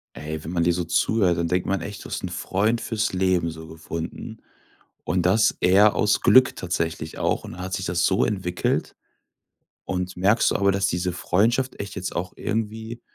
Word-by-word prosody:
Ey, 75 +1 -6
wenn 80 - -6
man 85 -2 +1
dir 85 - +3
so 90 +1 -2
zuhört, 90 +2 +2
dann 85 0 0
denkt 90 +1 0
man 95 -1 0
echt, 100 +1 -7
du - - -9
hast - - -4
'n - - -1
Freund 100 +6 0
fürs 110 -1 -1
Leben 90 -2 +1
so 80 0 -10
gefunden. 80 +1 -7 0.7
Und 90 -1 0
das 110 +4 +3
eher 100 +4 +5
aus 105 0 +2
Glück 130 0 +5
tatsächlich 80 -3 -3
auch - - 0
und - - -8
dann 90 - -9
hat 95 +1 -4
sich 95 - -3
das 85 -1 0
so 95 - +2
entwickelt. 90 -4 -1 0.9
Und 90 -1 -3
merkst 100 +5 +3
du - - -1
aber, 100 0 +3
dass 95 0 +1
diese 90 -1 -1
Freundschaft 115 +9 0
echt 100 - -6
jetzt 95 -1 -5
auch 90 +2 -3
irgendwie 110 +2 -4
90 Hz, 195 wpm, -24 LUFS, 85-105 Hz, 0.9 s, eher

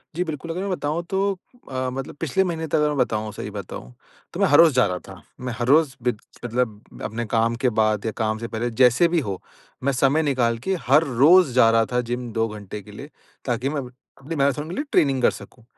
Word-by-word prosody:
जी, 180 - 0
बिल्कुल 165 0 -5
अगर 180 +3 -3
मैं 200 - -3
बताऊँ 170 -2 -2
तो 190 - 0 0.5
अ, 130 0 -2
मतलब 135 +2 -6
पिछले 165 +5 +1
महीने 165 -3 -3
तक - - -1
अगर 150 -1 +3
मैं 150 - -2
बताऊँ 110 -4 0
सही 105 - -6
बताऊँ 90 - -8 0.4
तो - - -6
मैं - - +4
हर 145 - +5
रोज़ 165 -3 +7
जा 125 -2 +4
रहा 90 -1 -3
था। 95 -2 -11 0.2
मैं 125 - -3
हर 120 -1 -2
रोज़ 145 -1 +4
बिद 125 -3 0 0.3
मतलब 115 -3 -3
अपने 115 +2 -3
काम 115 +1 +1
के 125 - +4
बाद 110 -1 +2
या 110 - 0
काम 110 -1 0
से 115 - -5
पहले। 115 +2 -3
जैसे 125 +7 +4
भी 170 0 +1
हो 100 - -4 0.4
मैं 140 - +2
समय 140 +4 +3
निकाल 125 -5 +1
के 190 - +1
हर 150 +5 +6
रोज़ 140 +3 +5
जा 120 -3 +6
रहा 115 0 +3
था 125 0 +1
जिम 120 -1 -3
2 115 0 +1
घंटे 105 -1 -8
के 105 - -14
लिए 140 +8 -10 0.4
ताकि 125 +1 -1
मैं 145 -1 -2 0.4
अपनी 165 +5 -5
मैराथन 140 +1 0
के 175 - -5
लिए 285 - -1
ट्रेनिंग 135 -3 +2
कर - - +4
सकूँ। 120 - -13
125 Hz, 235 wpm, -23 LUFS, 115-150 Hz, 0.5 s, रोज़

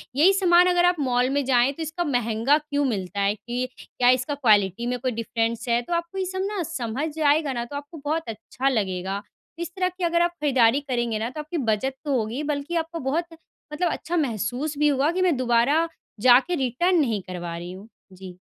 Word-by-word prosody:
यही 345 +8 +5
सामान 360 -2 +5
अगर 355 -1 +3
आप 355 0 +4
मॉल 250 -2 +1
में 285 +1 0
जाएँ, 255 0 +3
तो 320 - -5
इसका 320 +3 -3
महँगा 245 -1 +2
क्यों 290 -1 -2
मिलता 200 -5 -3
है, 200 +1 +2
कि 245 +3 -4
क्या 245 0 0
इसका 255 +3 +2
क्वालिटी 215 -4 +2
में 250 0 -1
कोई 255 0 -1
डिफरेंस 230 0 -2
है, 235 0 +3
तो 245 - -5
आपको 340 +2 -3
ये 380 - -1
सब 375 +1 -3
ना 410 -3 -3
समझ 295 0 -4
आएगा 295 -1 +2
ना 240 -1 -2
तो 285 - -9
आपको 290 +3 -7
बहुत 320 +2 0
अच्छा 250 +4 -2
लगेगा। 195 -4 -2 0.4
इस 340 0 -4
तरह 365 -1 +1
की 370 - -5
अगर 340 0 +2
आप 345 - +2
खरीदारी 260 -3 +4
करेंगे 240 -5 -2
ना, 225 +2 -2
तो 305 - -8
आपकी 310 +3 -5
बचत 265 +5 -1
तो 280 -3 +1
होगी 230 +5 -2
बल्कि 285 +4 -4
आपको 330 +1 -7
बहुत 335 +4 0 0.5
मतलब 335 +2 0
अच्छा 345 +2 -3
महसूस 275 - -2
भी 300 +1 +3
होगा 285 +3 +2
कि 370 +1 -1
मैं 355 -5 +3
दोबारा 255 +7 +2 0.4
जाके 260 +8 +6
रिटर्न 325 +6 +1
नहीं 225 -8 0
करवा 175 -2 -5
रही 175 +1 -7
हूँ। 195 +4 -11 0.3
जी। 185 -1 -11
270 Hz, 210 wpm, -24 LUFS, 235-325 Hz, 0.5 s, जाके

